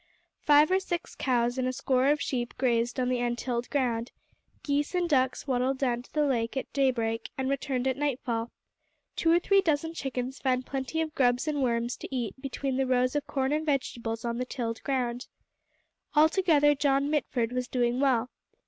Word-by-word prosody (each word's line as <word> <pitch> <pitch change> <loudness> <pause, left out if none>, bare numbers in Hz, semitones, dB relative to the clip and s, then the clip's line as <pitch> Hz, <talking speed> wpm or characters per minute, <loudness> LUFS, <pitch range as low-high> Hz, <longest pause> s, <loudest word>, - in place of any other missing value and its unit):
Five 295 +2 +5
or 375 - +4
six 350 -2 -4
cows 245 -1 0
and 255 - 0
a - - +1
score 260 0 +1
of 295 +1 +3
sheep 245 -4 -3
grazed 240 -1 +1
on 250 - +1
the 250 -1 0
untilled 240 0 -2
ground; 245 -4 -1 0.5
geese 290 +4 0
and 355 -1 +1
ducks 260 -5 +1
waddled 260 0 0
down 245 -3 0
to 250 - -20
the 300 -1 +1
lake 240 -2 -1
at 265 - -4
daybreak 235 -5 0
and 265 0 -1
returned 265 -2 -1
at 260 0 0
nightfall; 250 -5 -2 0.7
two 330 - +2
or 340 - +6
three 390 +3 +3
dozen 325 -2 0
chickens 265 -3 -4
found 255 -1 0
plenty 270 +4 -2
of 315 -1 -3
grubs 250 -1 +2
and 295 -2 0
worms 235 -1 0
to - - -7
eat 245 -5 -3
between 270 -1 -3
the 265 -1 +1
rows 255 +1 +2
of 295 - -1
corn 265 -1 -1
and 310 +1 -1
vegetables 235 -4 -2
on 235 0 -2
the - - 0
tilled 230 -3 -4
ground. 250 -2 -2 0.9
Altogether 310 -2 +4
John 280 0 +1
Mitford 250 -6 0
was 250 0 -2
doing 245 0 0
well. 255 -3 +2
260 Hz, 185 wpm, -28 LUFS, 245-290 Hz, 0.9 s, or